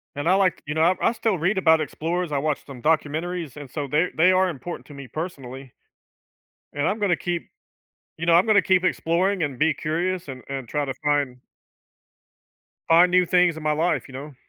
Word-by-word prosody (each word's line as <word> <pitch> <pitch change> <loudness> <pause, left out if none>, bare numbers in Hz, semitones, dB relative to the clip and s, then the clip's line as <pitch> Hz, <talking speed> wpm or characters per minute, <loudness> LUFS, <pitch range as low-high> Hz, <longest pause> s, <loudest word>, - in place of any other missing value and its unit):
And 145 +3 -3
I 180 - +5
like 190 -3 +1
you 150 - -3
know, 160 - 0
I 175 +3 +4
I - - 0
still 225 -5 -1
read 185 +6 0
about 160 -4 +4
explorers. 165 +3 -3
I 145 - 0
watched 150 0 -2
some 135 -4 -11
documentaries, 160 0 -1
and 145 -3 -9
so 145 +2 -4
they're 160 +6 +1
they 175 +4 +5
are 185 0 +3
important 170 +3 -7
to 145 - -12
me 140 -1 -9
personally. 135 -5 -7 1.0
And 145 +1 -1
I'm 210 +3 -1
gonna 195 -4 +2
keep 175 0 -4 0.7
you 165 - -4
know, 170 - +5
I'm 175 +5 +5
gonna 210 -3 +4
keep 185 -1 +2
exploring 185 +2 +1
and 140 -5 -3
be 155 -1 +2
curious 175 +3 -2
and 130 -2 -8
and 135 -3 -5
try 150 +3 -1
to 135 -2 -4
find 145 -4 0 1.5
find 175 +2 +5
new 180 0 +4
things 180 -2 +3
in 160 - -8
my 155 - +1
life, 160 +3 0
you 135 - -14
know? 140 +3 -8
160 Hz, 205 wpm, -23 LUFS, 145-180 Hz, 1.5 s, I